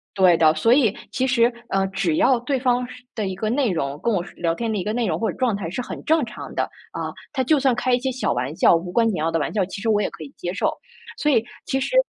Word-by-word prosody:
对 185 -3 +6
的， 155 -1 +5
所 225 +10 +4
以， 245 -7 +3 0.2
其 260 - 0
实， 240 -2 +3 0.2
呃， 195 0 +1
只 190 -4 0
要 255 -3 +4
对 265 +2 -1
方 250 -1 +1
是 250 0 -12
的 215 -3 -1
一 190 - -3
个 215 +3 -2
内 260 -1 +2
容 145 -4 -2
跟 235 - +2
我 180 -4 0
是 - - -13
聊 165 -1 0
天 230 +2 -2
的 215 - -1
一 - - -2
个 210 - -2
内 240 0 0
容 - - -1
或 225 - 0
者 - - -12
状 250 -5 +1
态 195 -5 -4
是 190 - -5
很 - - -7
正 315 -3 +3
常 220 - -9
的， - - +1 0.3
啊， - - -4 0.2
他 265 -3 +1
就 295 +3 +3
算 265 -2 +2
开 255 +1 0
一 245 - +3
些 265 +1 -1
小 260 - -1
玩 125 +4 -2
笑， 170 - +5
无 175 +2 -3
关 230 +4 +3
紧 215 - 0
要 155 +1 0
的 165 - +1
玩 145 - -2
笑， 205 -2 +2
其 190 - -7
实 225 - 0
我 210 -1 +3
也 - - 0
可 - - -10
以 140 - -11
接 175 - -3
受。 - - +1 0.5
所 300 - +2
以， 230 -5 +3 0.2
其 270 - 0
实， 385 - -2
220 Hz, 320 characters per minute, -23 LUFS, 180-250 Hz, 0.5 s, 对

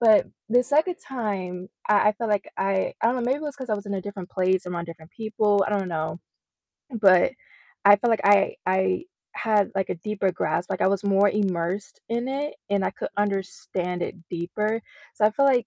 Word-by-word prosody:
But 220 -3 +6 0.2
the 245 +2 +5
2nd 315 +7 +2
time, 190 -8 -4 0.2
I 210 0 +5
I - - -5
felt 230 -2 -2
like 205 -1 0
I 195 -1 0
I - - +4
don't 245 - +1
know, 250 - -2
maybe 260 +4 +1
it - - -9
was 290 -2 -5
'cause 260 -4 -6
I 215 - +3
was 205 0 -7
in 200 - -3
a 190 - -3
different 200 -2 -7
place 185 0 +1
around 175 -1 -4
different 165 0 -12
people, 215 -3 +1
I - - -3
don't 190 -2 -3
know. 160 -1 -3 0.8
But 190 +4 +6 0.5
I 205 0 +9
felt 235 +3 0
like 225 - +2
I 200 -1 +5
I 190 - +1 0.3
had, 215 -3 +2
like, 195 -1 -1
a - - 0
deeper 195 +1 -1
grasp, 175 0 -1
like, - - -2
I - - +4
was 200 0 0
more 200 0 +4
immersed 190 -1 -2
in 235 +1 -1
it, 285 +2 -2 0.2
and 200 -1 +2
I - - +2
could - - -6
understand 190 -3 -2
it - - -3 0.2
deeper. 210 +6 -2 0.3
So 210 - +1
I - - +3
feel 275 +6 +2
like 250 -4 +3
200 Hz, 215 wpm, -25 LUFS, 185-225 Hz, 0.8 s, I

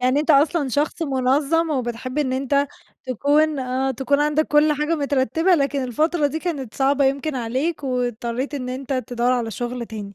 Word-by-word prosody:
يعني 255 +3 +2
أنت 310 - 0
أصلًا 295 0 +3
شخص 295 +6 -1
مُنظّم 285 +4 +1
وبتحب 255 0 -3
إن 260 -3 0
أنت 280 +2 +1 0.4
تكون 290 +4 +2
آه 260 +1 -1
تكون 275 +3 0
عندك 300 +1 +2
كل 300 +1 +4
حاجة 300 +3 0
مترتبة 285 +5 +2
لكن 280 -3 0
الفترة 305 +5 +1
دي 305 +3 -3
كانت 290 -9 -4
صعبة 275 +1 +2
يمكن 275 +2 0
عليك 260 +6 -2
واضطريت 245 +1 -2
إن 255 -3 -4
أنت 260 +1 -4
تدوّر 250 -1 0
على 235 -3 -1
شُغل 240 +3 -4
تاني. 205 -3 -8
275 Hz, 170 wpm, -22 LUFS, 250-295 Hz, 0.4 s, كل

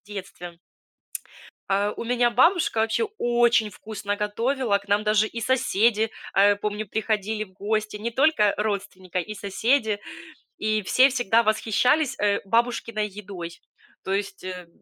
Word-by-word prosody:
в - - -36
детстве. 185 -4 -8 1.1
А 200 +1 +1
у - - -5
меня 240 0 +2
бабушка 335 - +3
вообще 225 - +1
очень 240 -2 +3
вкусно 205 0 -5
готовила. 225 +1 0
К 200 - -20
нам 205 +1 +2
даже 215 0 +3
и 230 +2 -6
соседи, 225 -3 +2 0.2
а, 200 +1 +5
помню, 210 0 -4
приходили 215 0 -1
в 190 - -21
гости, 215 +2 -2
не 225 +3 -4
только 265 -5 +3
родственника, 200 -3 -3
и 215 +5 -6
соседи, 215 +2 0 0.6
и 215 0 0
все 255 +8 +5
всегда 235 -3 +2
восхищались, 250 +6 +1
э, 205 -1 +1
бабушкиной 230 0 0
едой. 185 -4 -9 0.4
То 190 - -3
есть, 195 -1 -4
э, 180 -2 -7
215 Hz, 140 wpm, -24 LUFS, 200-235 Hz, 1.1 s, а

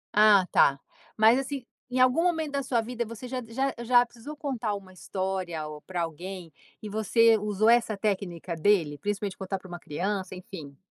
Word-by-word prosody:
Ah 210 -3 +6
tá. 140 0 +4 0.4
Mas 220 +4 +6
assim, 270 -1 -4 0.2
em 255 +1 -1
algum 255 +5 +4
momento 325 -4 0
da 280 0 -1
sua 245 -3 0
vida, 240 +1 -3
você 230 +2 -8
já 255 0 -3
já 265 +4 -1
já 245 +1 +5
precisou 240 +6 -10
contar 245 -8 -2
uma 190 -2 -10
história 185 -1 -3
ou 150 0 -9
para 175 0 -3
alguém, 170 +1 -7 0.3
e 215 - -5
você 225 +2 +4
usou 210 +1 0
essa 230 -3 +4
técnica 185 -5 -2
dele? 165 -5 +2
Principalmente 205 +2 -3
contar 195 0 -3
para 190 - -13
uma 175 -1 -7
criança, 190 +5 -3
enfim. 180 - -10
210 Hz, 180 wpm, -27 LUFS, 185-240 Hz, 0.4 s, Ah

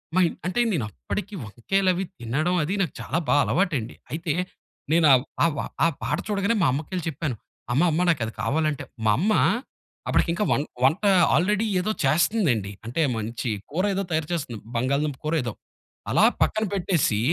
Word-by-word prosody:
మా - - +4
ఇంట్ - - -6
అంటే 185 +6 -1
నేనప్పటికి 140 - -4
వంకాయలు 185 - 0
అవి 180 +2 -2 0.2
తినడం 150 +10 0
అది 165 +6 -2
నాకు 175 -8 -1
చాలా 160 - -2
బా - - +3
అలవాటండి. 145 - 0 0.2
అయితే 160 0 -2 0.6
నేనా 160 -2 +5 0.3
ఆ - - +6
వ - - -2 0.3
ఆ - - +6 0.2
పాట 150 - 0
చూడగానే 205 +2 +1
మా - - +5
అమ్మకెళ్లి 160 +5 -3
చెప్పాను. 145 -3 -3 0.4
అమ్మ, 135 - +3
అమ్మ 160 +3 +1
నాకది 120 -9 0
కావాలంటే 150 +6 0 0.2
మా 110 - +5
అమ్మ 205 +6 +2 0.8
అప్పటికి - - +2
ఇంకా 185 - 0
వం - - +3 0.2
వంట 155 +10 +3 0.3
ఆల్రెడీ 210 +4 +2 0.2
ఏదో 215 - -1
చేస్తుందండి. 155 - +2
అంటే 120 +8 -1 0.2
మంచి 115 +2 -3 0.2
కూర 175 +5 0
ఏదో 195 - 0
తయారు 155 0 -1
చేస్తుంది. 130 -9 -3 0.2
బంగాళదుంప 140 +3 0
కూరో 160 +2 +1
ఏదో. 120 -3 -3 0.6
అలా - - +5 0.2
పక్కన 220 0 +2
పెట్టేసి, 175 - +1
155 Hz, 165 wpm, -25 LUFS, 125-185 Hz, 0.8 s, ఆ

